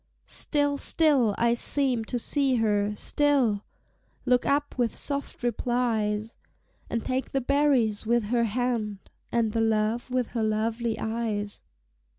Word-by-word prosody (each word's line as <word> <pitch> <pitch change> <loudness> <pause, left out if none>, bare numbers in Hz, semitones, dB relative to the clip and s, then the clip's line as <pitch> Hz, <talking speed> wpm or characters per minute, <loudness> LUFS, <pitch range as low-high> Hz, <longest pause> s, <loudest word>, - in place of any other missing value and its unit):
Still, 290 -2 +2
still 275 -10 +3
I 235 0 +2
seemed 245 -2 0
to 245 - -2
see 270 +2 +1
her, 210 -2 +1
still 255 -5 +3 0.6
Look 250 -1 +2
up 290 +1 0
with 240 -3 -1
soft 280 -3 -4
replies, 230 -3 -1 0.5
And 230 - -3
take 260 +1 -2
the 270 - +2
berries 260 -6 +1
with 235 +1 +1
her 235 -1 +2
hand, 220 -3 -3 0.2
And 230 -2 +1
the 225 - 0
love 225 +2 0
with 250 -2 -1
her 235 - -3
lovely 220 +1 -1
eyes. 220 -2 -3
235 Hz, 135 wpm, -26 LUFS, 220-255 Hz, 0.6 s, still